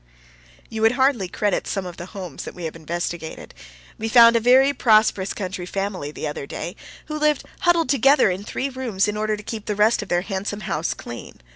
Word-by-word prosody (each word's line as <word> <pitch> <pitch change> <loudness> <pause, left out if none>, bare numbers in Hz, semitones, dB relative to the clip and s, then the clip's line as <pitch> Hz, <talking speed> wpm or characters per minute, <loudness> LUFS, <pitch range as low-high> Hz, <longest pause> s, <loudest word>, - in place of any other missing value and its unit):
You 220 - -5
would 225 +2 +5
hardly 260 -6 +2
credit 205 +2 -1
some 195 -2 -2
of 175 -1 -8
the 175 - -7
homes 185 -7 -7
that - - -8
we 180 - -8
have 160 -1 -4
investigated. 170 0 -5 0.5
We 225 +1 -2
found 235 0 +8
a - - +5
very 260 +4 +5
prosperous 215 -6 +3
country 185 -2 -5
family 195 -6 -3
the 150 - -6
other 150 -2 -4
day, 175 +6 -6 0.3
who 305 0 -5
lived 300 0 +2 0.2
huddled 340 -4 +2
together 275 -4 +4
in 185 +2 -4
three 265 +5 -3
rooms 245 -7 -1
in 210 - -2
order 215 0 -1
to 210 - -10
keep 220 0 -6
the 210 - -1
rest 215 +3 +3
of 205 - -8
their 175 0 +2
handsome 200 +1 -4
house 170 -4 -2
clean. 120 - -9
210 Hz, 210 wpm, -22 LUFS, 180-235 Hz, 0.5 s, found